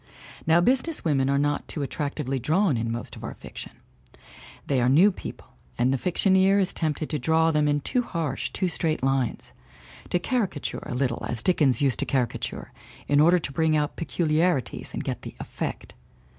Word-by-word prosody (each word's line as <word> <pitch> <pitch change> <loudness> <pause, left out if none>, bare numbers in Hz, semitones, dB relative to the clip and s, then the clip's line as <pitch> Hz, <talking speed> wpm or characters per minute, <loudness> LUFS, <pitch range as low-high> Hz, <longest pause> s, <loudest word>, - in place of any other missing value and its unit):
Now 165 +2 +5
business 260 - +1
women 135 -4 +2
are 140 - +2
not 145 0 0
too 150 - -4
attractively 135 -2 -3
drawn 160 - +2
in 115 0 -2
most 115 0 -5
of - - -11
our - - -5
fiction. - - -9 0.9
They 135 -3 +1
are 120 - +3
new 175 +10 +6
people, - - -9 0.3
and 125 +2 +2
the - - +1
fictioneer 190 +3 +3
is 190 - 0
tempted 155 -1 -1
to 150 - -1
draw 160 +4 +3
them 150 -1 +2
in 145 0 +1
too 250 - +1
harsh, 165 - -3
too 190 - -1
straight 160 -4 -1
lines; 135 -2 -1 0.6
to - - +2
caricature 195 - -2
a - - -4
little 125 -2 -1
as 120 -1 -3
Dickens 145 -6 +3
used 130 -6 +1
to - - -1
caricature, 125 -4 -2 0.4
in 145 0 +3
order 170 +4 +6
to 155 -4 -4
bring 160 -1 +2
out 150 -1 -1
pecu 170 +1 -2
liarities 155 -3 0
and - - -4
get - - -4
the - - -9
"effect." - - -5
150 Hz, 185 wpm, -26 LUFS, 135-175 Hz, 0.9 s, new